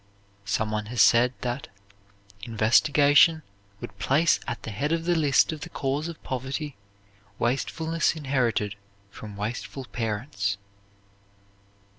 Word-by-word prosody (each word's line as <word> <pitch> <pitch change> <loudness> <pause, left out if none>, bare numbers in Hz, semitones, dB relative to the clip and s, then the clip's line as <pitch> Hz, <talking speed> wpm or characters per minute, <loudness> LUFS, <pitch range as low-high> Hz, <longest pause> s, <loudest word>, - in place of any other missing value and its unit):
Some 105 +2 -1
one 105 0 -2
has 120 +1 -5
said 115 +4 +6
that 125 +2 -3 0.7
"investigation 145 +8 +4 0.4
would 100 0 -9
place 150 +8 +3
at 120 - -4
the 110 - -5
head 140 +9 -2
of 165 0 0
the 175 - +2
list 150 -4 +3
of 155 -2 -7
the - - -7
cause 140 +3 -2
of 170 -1 -9
poverty, 135 +3 -4 0.6
wastefulness 160 +7 0
inherited 130 -8 0 0.4
from 105 -1 -10
wasteful 120 +5 -5
parents." 105 -3 -2
130 Hz, 120 wpm, -26 LUFS, 110-150 Hz, 0.7 s, said